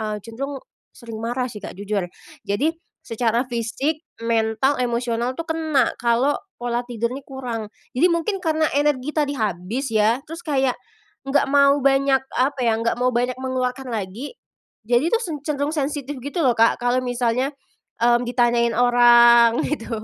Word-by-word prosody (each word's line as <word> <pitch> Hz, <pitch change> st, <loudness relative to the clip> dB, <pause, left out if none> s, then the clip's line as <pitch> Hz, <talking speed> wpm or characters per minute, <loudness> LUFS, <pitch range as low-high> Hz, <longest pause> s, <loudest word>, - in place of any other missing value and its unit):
eee, 215 Hz, -1 st, -2 dB
cenderung 270 Hz, +5 st, -6 dB, 0.3 s
sering 230 Hz, -3 st, -9 dB
marah 245 Hz, +2 st, -1 dB
sih 215 Hz, -, -8 dB
Kak, -, -, -7 dB
jujur. 200 Hz, -2 st, -2 dB, 0.4 s
Jadi, 260 Hz, +11 st, +1 dB, 0.3 s
secara 230 Hz, 0 st, 0 dB
fisik, 260 Hz, +7 st, -2 dB, 0.2 s
mental, 230 Hz, +4 st, +1 dB
emosional 240 Hz, 0 st, -1 dB
tuh 330 Hz, -, -3 dB
kena, 315 Hz, -5 st, +1 dB
kalau 240 Hz, +4 st, +2 dB, 0.2 s
pola 240 Hz, 0 st, -2 dB
tidur 235 Hz, -1 st, -2 dB
ini 275 Hz, -, -6 dB
kurang. 245 Hz, -5 st, -5 dB, 0.3 s
Jadi 325 Hz, +8 st, +5 dB
mungkin 335 Hz, +4 st, -1 dB
karena 315 Hz, -2 st, +1 dB
energi 290 Hz, -1 st, +1 dB
tadi 295 Hz, -2 st, +1 dB
habis 215 Hz, +4 st, -2 dB
ya, 220 Hz, +4 st, +3 dB
terus 325 Hz, +2 st, -8 dB
kayak 270 Hz, -4 st, +1 dB, 0.5 s
nggak 285 Hz, +1 st, +2 dB
mau 280 Hz, 0 st, +5 dB
banyak, 270 Hz, 0 st, +3 dB, 0.2 s
apa 270 Hz, +2 st, +1 dB
ya, 225 Hz, -1 st, +2 dB
nggak 230 Hz, 0 st, +1 dB
mau 250 Hz, 0 st, +3 dB
banyak 245 Hz, +1 st, 0 dB
mengeluarkan 255 Hz, 0 st, -2 dB
lagi. 220 Hz, -, -5 dB, 0.5 s
Jadi 245 Hz, +7 st, +2 dB
tuh, 460 Hz, -, +4 dB
sen 335 Hz, -8 st, -4 dB
cenderung 290 Hz, -1 st, -1 dB
sensitif 290 Hz, -1 st, -3 dB
gitu 285 Hz, +6 st, -5 dB
loh 255 Hz, -, +5 dB
Kak, 230 Hz, +1 st, +4 dB
kalau 245 Hz, +1 st, +2 dB
misalnya, 245 Hz, +1 st, 0 dB, 0.5 s
mmm, 240 Hz, 0 st, +4 dB
ditanyain 240 Hz, -1 st, +2 dB
orang, 240 Hz, -1 st, +6 dB
gitu. 230 Hz, -6 st, -3 dB
250 Hz, 155 wpm, -22 LUFS, 235-280 Hz, 0.5 s, orang